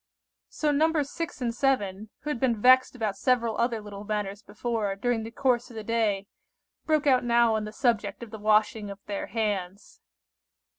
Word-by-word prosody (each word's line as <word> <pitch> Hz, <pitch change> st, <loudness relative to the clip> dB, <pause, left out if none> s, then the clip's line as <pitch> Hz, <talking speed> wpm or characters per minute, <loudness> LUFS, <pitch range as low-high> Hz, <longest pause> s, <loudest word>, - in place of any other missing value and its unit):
So 300 Hz, -, 0 dB
Nos. 300 Hz, -1 st, +1 dB
6 330 Hz, -5 st, -5 dB
and 235 Hz, -2 st, -1 dB
7, 215 Hz, -6 st, 0 dB
who 300 Hz, -, -5 dB
had 250 Hz, -, -3 dB
been 235 Hz, -4 st, +1 dB
vexed 255 Hz, +3 st, +5 dB
about 215 Hz, -5 st, -2 dB
several 235 Hz, -4 st, +1 dB
other 235 Hz, -1 st, +1 dB
little 205 Hz, -1 st, -9 dB
matters 205 Hz, -1 st, -3 dB
before, 210 Hz, -1 st, -3 dB
during 230 Hz, +3 st, 0 dB
the 225 Hz, -, -6 dB
course 245 Hz, 0 st, 0 dB
of 235 Hz, -, -12 dB
the 220 Hz, -, -5 dB
day, 210 Hz, -3 st, 0 dB, 0.6 s
broke 310 Hz, -2 st, +2 dB
out 260 Hz, -3 st, +4 dB
now 235 Hz, -1 st, +4 dB
on 215 Hz, -1 st, -1 dB
the 215 Hz, -, -6 dB
subject 235 Hz, -1 st, 0 dB
of 225 Hz, -, -10 dB
the 220 Hz, -, -8 dB
washing 215 Hz, 0 st, +2 dB
of 200 Hz, -, -7 dB
their 205 Hz, -1 st, -4 dB
hands. 200 Hz, -4 st, -3 dB
225 Hz, 185 wpm, -27 LUFS, 210-250 Hz, 0.6 s, vexed